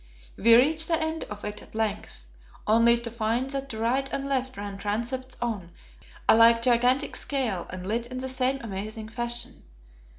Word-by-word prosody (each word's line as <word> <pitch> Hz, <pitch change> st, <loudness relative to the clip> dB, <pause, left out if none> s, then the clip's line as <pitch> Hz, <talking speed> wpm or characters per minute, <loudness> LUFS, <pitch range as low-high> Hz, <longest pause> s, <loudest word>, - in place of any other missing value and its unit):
We 230 Hz, +2 st, +6 dB
reached 310 Hz, +6 st, +4 dB
the 330 Hz, -1 st, +2 dB
end 320 Hz, 0 st, -2 dB
of 210 Hz, 0 st, -8 dB
it 210 Hz, 0 st, -5 dB
at -, -, -16 dB
length, 210 Hz, -, -2 dB, 0.4 s
only 230 Hz, +2 st, +5 dB
to 235 Hz, 0 st, -4 dB
find 235 Hz, +3 st, 0 dB
that 275 Hz, 0 st, -3 dB
to 220 Hz, -, -5 dB
right 255 Hz, +5 st, 0 dB
and 275 Hz, 0 st, -2 dB
left 260 Hz, -3 st, -1 dB
ran 200 Hz, -1 st, -6 dB
transepts 235 Hz, +6 st, -3 dB
on 210 Hz, -8 st, -3 dB, 0.6 s
a -, -, +7 dB
like 230 Hz, 0 st, +6 dB
gigantic 250 Hz, +2 st, +3 dB
scale 240 Hz, -11 st, -2 dB
and 185 Hz, 0 st, -6 dB
lit 230 Hz, +4 st, -1 dB
in 255 Hz, +1 st, -6 dB
the 260 Hz, +1 st, -3 dB
same 260 Hz, +1 st, 0 dB
amazing 215 Hz, +1 st, -5 dB
fashion. 240 Hz, +1 st, -4 dB
235 Hz, 175 wpm, -27 LUFS, 215-260 Hz, 0.6 s, a